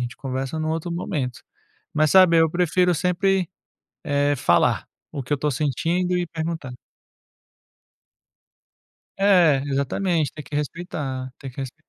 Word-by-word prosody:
gente 120 0 -5
conversa 135 +3 -4
num 155 0 -2
outro 165 +2 -2
momento. 150 - -3 0.5
Mas 155 -1 +2
sabe, 185 -3 +6
eu 160 -1 +4
prefiro 180 +1 +2
sempre, 185 +1 +1 0.6
eh, 145 0 +1
falar 85 -7 +2 0.3
o 140 - -4
que 130 +4 -5
eu - - +5
estou 150 +2 -1
sentindo, 165 +7 0
e 175 - -1
perguntar. 160 -5 -5 2.4
É, 175 -9 +4
exatamente. 150 +4 0
Tem 150 - -8
que 145 - -6
respeitar, 140 -4 -4
tem 135 - -8
que 130 - -20
resp 135 +1 -6
155 Hz, 135 wpm, -23 LUFS, 135-175 Hz, 2.4 s, sabe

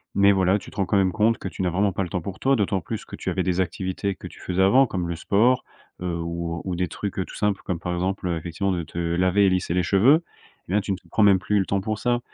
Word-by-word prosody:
mais 100 0 +5
voilà, 95 +1 +2
tu - - -12
te - - -16
rends 95 - 0
quand 100 - +1
même 95 -2 +2
compte 110 +1 +2
que - - -6
tu 95 - -6
n'as 90 - +1
vraiment 95 +2 +1
pas 95 - -1
le 90 - -5
temps 90 - -2
pour 95 +2 -6
toi, 135 -1 +2
d'autant 95 -2 0
plus - - -6
que - - -9
tu - - -4
avais - - 0
des 95 0 +1
activités 95 +2 -2
que - - -9
tu - - -14
faisais 90 +1 -1
avant, 125 +8 +6
comme 90 -6 -3
le 85 - -3
sport, 115 +9 +2 0.4
heu, 90 -1 -2
ou 85 0 -4
ou 90 -2 -2
des 90 -1 -1
trucs 100 -2 -5
tout - - -11
simples, 105 -2 0
comme 90 -3 -3
par 90 0 -3
exemple, 95 +1 -2
heu, 85 - 0
effectivement 85 +4 -2
de 85 -2 -2
te 85 - -11
laver 90 +4 +2
et - - +5
lisser 90 -2 0
les 90 -1 +1
cheveux, 130 - +4 0.4
mais 95 - -1
là, 105 - +3
tu 100 - -4
ne 95 - -1
te - - -22
prends 110 - +2
même 100 -2 +6
plus 105 +2 0
le 95 - +1
temps 100 - 0
pour 110 0 -3
ça, 120 -1 +1
95 Hz, 300 wpm, -24 LUFS, 90-100 Hz, 0.4 s, avant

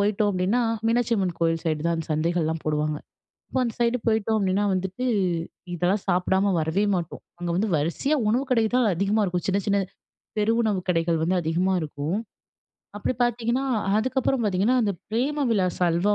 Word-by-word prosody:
போயிட்டோம் 205 0 +2
அப்பிடின்னா, 195 +6 +1 0.3
மீனாட்சி 235 0 +2
அம்மன் 185 -4 -1
கோவில் 165 -1 +1
சைடு 155 -2 0
தான் 170 - +2
அந்த 165 - -4
சந்தைகள்லாம் 160 0 0
போடுவாங்க. 150 0 0 0.5
அப்போ 260 - -1
அந்த 230 -3 -2
சைடு 235 +1 +2
போயிட்டோம் 220 0 +2
அப்பிடின்னா 195 +1 +1
வந்துட்டு 190 +6 -3 0.7
இதெல்லாம் 180 +4 +1
சாப்பிடாம 190 +2 +2
வரவே 160 +6 0
மாட்டோம். 170 -3 -4 0.2
அங்க 175 0 -3
வந்து 210 +4 +1
வரிசையா 170 - 0
உணவு 245 +5 +2
கடை 230 -3 +3
தான் 250 -3 +4
அதிகமா 200 +4 +1
இருக்கும். 180 -2 -2
சின்ன, 195 +1 +2
சின்ன 200 0 +3 0.6
பெரு 210 +2 +2
உணவுக் 200 -5 -1
கடைகள் 165 -1 +2
வந்து 185 +3 +1
அதிகமா 175 +4 +1
இருக்கும். 150 +4 -3 0.8
அப்பிடி 210 +5 -1
பார்த்தீங்கன்னா, 240 +2 0 0.3
அதுக்கப்பறம் 260 +1 0
பார்த்தீங்கன்னா, 205 +6 +2
அந்த 205 -2 +1 0.2
பிரேம 280 +6 0
விலாஸ் 185 -5 +1
அல்வா 175 +5 +2
195 Hz, 165 wpm, -25 LUFS, 170-225 Hz, 0.8 s, தான்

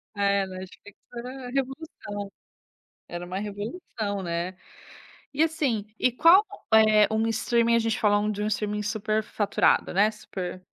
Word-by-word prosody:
É, 200 -1 +2
Netflix 190 +2 -11 0.2
era 250 +1 -7
revolução. 275 +4 -2 1.2
Era 175 0 -6
uma 185 +2 -5
revolução, 205 - -5
né. 170 +2 -3 0.8
E 305 +3 +3
assim, 280 -10 0
e 255 - +3
qual 335 - +6 0.3
eh, 215 -1 +6
um 220 +1 +1
streaming 235 +1 +2
a - - +4
gente 225 +1 -1
falando 210 0 +2
de 205 - -5
um - - 0
streaming 210 0 -1
superfaturado, 215 -1 +1
né, 205 +3 +4
super, 190 -4 -6
enf 185 - -21
215 Hz, 140 wpm, -26 LUFS, 200-235 Hz, 1.2 s, qual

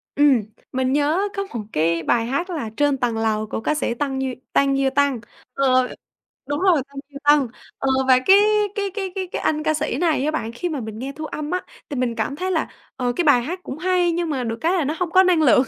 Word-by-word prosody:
Ừm, 285 -5 +5 0.3
mình 260 0 0
nhớ 310 +8 +2
có 395 - -1
một 245 - -6
cái 165 +1 +1
bài 230 +5 +2
hát 280 +9 -2
là 295 -11 -3
"Trên 290 -2 +2
tầng 240 -3 -1
lầu" 215 -1 0
của 220 - -4
ca 305 - 0
sĩ 265 - -1
Tăng 265 +1 -2
Duy 260 -1 -2 0.2
Tăng 275 -1 +3
Duy 270 -1 +2
Tân, 285 -4 +2 0.3
ờ, 255 -2 +3 0.6
đúng 290 +1 -1
rồi 355 -7 +4
Tăng 280 0 -16
Duy 280 - -9
Tân, 290 -3 +5 0.3
ờ, 270 - -1 0.2
và 255 -1 +6
cái 385 +9 +6 0.4
cái 400 -1 -1
cái 385 -3 -3
cái 375 -1 -3
cái - - -3
anh 305 0 0
ca 310 - +2
sĩ 300 -4 -2
này 315 -4 +1
á 305 - +1
bạn 230 -7 -3
khi 350 +8 -3
mà 300 - -3
mình 220 0 -7
nghe 270 +2 -4
thu 310 +1 -6
âm 300 +1 -5
á, 365 - 0 0.3
thì 285 - -4
mình 245 -2 0
cảm 225 +5 -2
thấy 370 +4 -2
là, 320 - 0 0.3
ờ, 245 -1 -1
cái 350 - +1
bài 265 -5 +5
hát 360 +7 -4
cũng 275 - -6
hay 360 -1 +2
nhưng 340 0 -1
mà 265 -4 -1
được 225 -1 -3
cái 335 +3 +2
là 355 -5 +1
nó 300 +4 -1
hông 350 -2 -1
có 375 - +6
năng 360 -3 +3
lượng, 255 -1 +5
285 Hz, 255 wpm, -22 LUFS, 255-330 Hz, 0.6 s, và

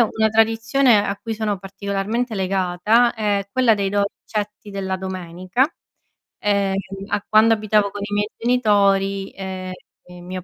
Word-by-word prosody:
una 220 -1 +2
tradizione 225 +1 +3
a 200 - -2
cui 225 -2 -4
sono 210 -2 -2
particolarmente 200 +5 -3
legata 190 +5 +2
è 205 -3 -1
quella 255 -3 +4
dei 200 -2 -1
dolcetti 205 +1 -3
della 195 -1 -3
domenica, 185 +4 -2 0.7
ehm, 200 -2 +1 0.3
a 205 -1 -2
quando 220 +1 +5
abitavo 210 -1 +1
con 205 0 -7
i 205 - -6
miei 205 +1 0
genitori, 200 -5 +2
ehm, 190 -1 -6 0.5
mio 185 0 -6
205 Hz, 130 wpm, -21 LUFS, 195-220 Hz, 0.7 s, quando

